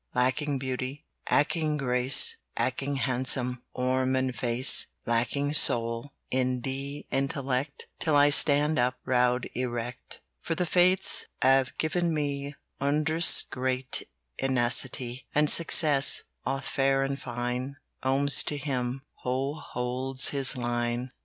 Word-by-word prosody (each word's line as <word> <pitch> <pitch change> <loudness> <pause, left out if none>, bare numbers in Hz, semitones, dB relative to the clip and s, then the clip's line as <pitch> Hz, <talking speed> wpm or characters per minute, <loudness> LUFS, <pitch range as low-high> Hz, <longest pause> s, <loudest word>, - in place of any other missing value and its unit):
"Lacking 135 +3 0
beauty, 130 +1 -5 0.2
Lacking 155 0 0
grace, 125 -1 +4 0.2
Lacking 140 +2 -2
handsome 125 -1 0
Form 130 +1 0
and 130 -1 -1
face; 120 +2 +3 0.2
"Lacking 125 +5 -1
soul 115 -2 +3 0.2
And 125 -1 -1
intellect, 135 0 -4
Still 155 -2 0
I 145 0 +5
stand 145 +1 +4
up, 125 +1 0
Proud, 125 -1 +1
erect. 120 -1 -6 0.2
"For 165 - -3
the 180 - -1
Fates 180 +2 +2 0.2
Have 130 0 +2
given 170 +1 -1
me 140 -1 -4 0.2
Wondrous 155 +4 +3
great 130 0 -2 0.4
Tenacity. 125 0 0
"And 150 0 +4
success, 150 -4 +4 0.2
Both 135 0 -4
fair 135 0 0
and 135 0 -4
fine, 125 +2 -4 0.3
Comes 135 +2 +3
to 150 - -2
him 130 -2 -4 0.2
Who 130 +3 -2
holds 130 -1 -1
his 135 -2 +2
line. 120 +1 -3
130 Hz, 115 wpm, -27 LUFS, 125-145 Hz, 0.4 s, I